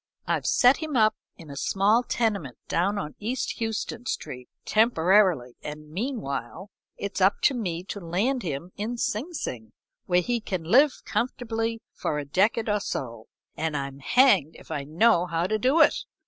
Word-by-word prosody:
"I've - - -1
set 255 +1 +5
him 310 -5 -3
up 215 -1 +4 0.2
in 160 -4 -11
a - - -8
small 200 - +2
tenement 210 - -1
down 195 +5 +1
on 150 -7 -4
East 240 +5 -3
Houston 225 +2 -3
Street 125 0 -5 0.2
temporarily, 185 - +3
and 150 0 -8
meanwhile, 190 - -4 0.3
it's 200 -1 -4
up 190 +2 +4
to 280 - +4
me 180 -8 -3
to 200 +2 -6
land 200 +10 -1
him 165 0 -5
in 225 +4 -3
Sing 235 +8 -2
Sing, 115 - -6 0.3
where 180 0 +3
he 235 +4 -1
can 185 -5 -3
live 265 - +4
comfortably 225 -2 -2
for 150 - -2
a 145 - -3
decade 210 +9 +1
or 210 -1 +1
so, 115 - -5 0.3
and 160 -2 -2
I'm 140 0 -5
hanged 195 - +4
if - - -14
I 145 -3 -3
know 175 +4 +3
how 165 0 -1
to 215 +3 0
do 265 +9 +3
it. - - +6
200 Hz, 170 wpm, -26 LUFS, 155-230 Hz, 0.3 s, it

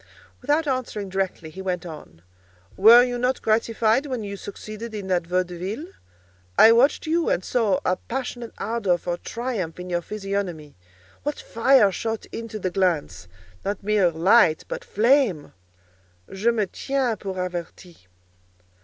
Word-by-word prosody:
Without 300 +2 +1
answering 240 -7 -2
directly, 185 -4 -3
he 190 - -8
went 180 -2 -3
on, 150 - -11 0.5
"Were 230 +5 +8
you 245 -1 -2
not 250 +1 0
gratified 225 +4 +2
when 255 -5 -3
you 200 -1 -5
succeeded 215 +3 -8
in 205 -2 -5
that 175 -2 0
vaudeville? 180 - -2 0.7
I 225 - +9
watched 245 +5 +3
you 330 +1 +1
and 185 - 0
saw 215 -6 +1
a 185 - +1
passionate 245 -1 -5
ardour 205 -5 0
for 175 0 -3
triumph 220 -8 -4
in 180 0 -7
your 175 0 0
physiognomy. 195 -6 -4 0.5
What 295 0 -3
fire 230 -3 +4
shot 225 +3 -3
into 225 -1 -6
the 185 -3 -3
glance! 170 - -1 0.4
Not 200 0 -3
mere 205 -3 +3
light, 170 +1 +4
but - - -5
flame: 230 - +2 0.8
je 200 +5 +1
me 225 -3 +1
tiens 260 +2 -2
pour 195 -2 -5
averti." 175 - -6
205 Hz, 145 wpm, -24 LUFS, 180-235 Hz, 0.8 s, I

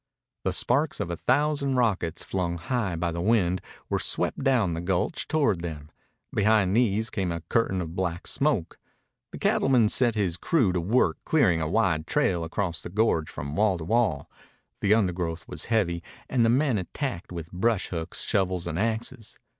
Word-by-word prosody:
The - - +2
sparks 140 +5 +1
of 85 - -2
a - - -2
thousand 140 - +1
rockets, 100 -9 0
flung 85 -2 -2
high 100 0 -2
by 85 +1 -1
the 85 +1 -3
wind, 95 -3 +2 0.3
were - - 0
swept - - -1
down 120 - +2
the 85 - -3
gulch 90 - -1
toward 140 - +1
them. 80 -3 -6 0.4
Behind 105 -2 +3
these 110 -2 +2
came 95 -4 -1
a 85 0 -4
curtain 95 +1 0
of 85 -1 -6
black 90 -2 -2
smoke. 135 - 0 0.5
The - - -7
cattleman 125 -5 +3
set 120 -1 +2
his 95 -5 0
crew 125 - +2
to 90 - 0
work 110 +9 +2
clearing 110 - +3
a 80 - -1
wide 85 -6 +1
trail 85 -2 +1
across 85 0 -3
the - - -7
gorge 95 -5 +1
from 75 0 -6
wall 100 -1 +2
to 80 - -6
wall. 105 -9 +1 0.5
The 105 +2 +4
undergrowth 90 -5 -1
was - - -6
heavy, 95 -7 +1 0.3
and 125 -3 +2
the 115 - +4
men 130 -2 +2
attacked 95 - -4
with 85 -2 -7
brush 105 +3 0
hooks, 80 -1 -3
shovels, 95 -3 0
and 85 0 -3
axes. 115 +1 -3
95 Hz, 180 wpm, -26 LUFS, 85-115 Hz, 0.5 s, The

